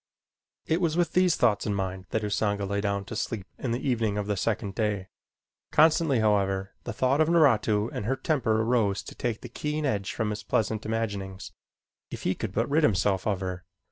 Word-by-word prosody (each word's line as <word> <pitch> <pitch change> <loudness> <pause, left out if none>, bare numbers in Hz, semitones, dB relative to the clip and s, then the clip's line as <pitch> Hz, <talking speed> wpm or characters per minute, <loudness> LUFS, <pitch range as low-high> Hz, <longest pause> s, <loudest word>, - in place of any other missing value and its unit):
It 165 +3 +1
was 165 -2 +1
with 175 -2 +1
these 180 -2 +4
thoughts 105 0 +2
in 105 - 0
mind 95 -1 -3
that 110 - -1
Usanga 105 -1 0
lay 100 +1 -1
down 100 -1 -1
to 110 - -7
sleep 110 -3 -3
in 130 - -3
the 120 +4 -2
evening 110 -5 +1
of 105 - -1
the 105 0 -1
second 105 0 -1
day. 105 -3 -1 0.6
Constantly, 155 -3 +4
however, 95 -2 +1
the - - -3
thought 135 +4 +2
of 155 - +3
Naratu 115 -10 +4
and 100 - -4
her 130 +4 +1
temper 125 -8 +1
arose 110 -4 +1
to - - -9
take 115 -3 -3
the - - -7
keen 150 0 -3
edge 100 -7 -1
from 110 -2 -2
his 105 0 -4
pleasant 110 0 -1
imaginings. 100 -4 -3 0.6
If - - -7
he 95 - +1
could - - -4
but 115 +4 0
rid 150 +3 +2
himself 95 - +2
of 100 -3 0
her! 90 -1 -4
110 Hz, 205 wpm, -27 LUFS, 100-130 Hz, 0.6 s, these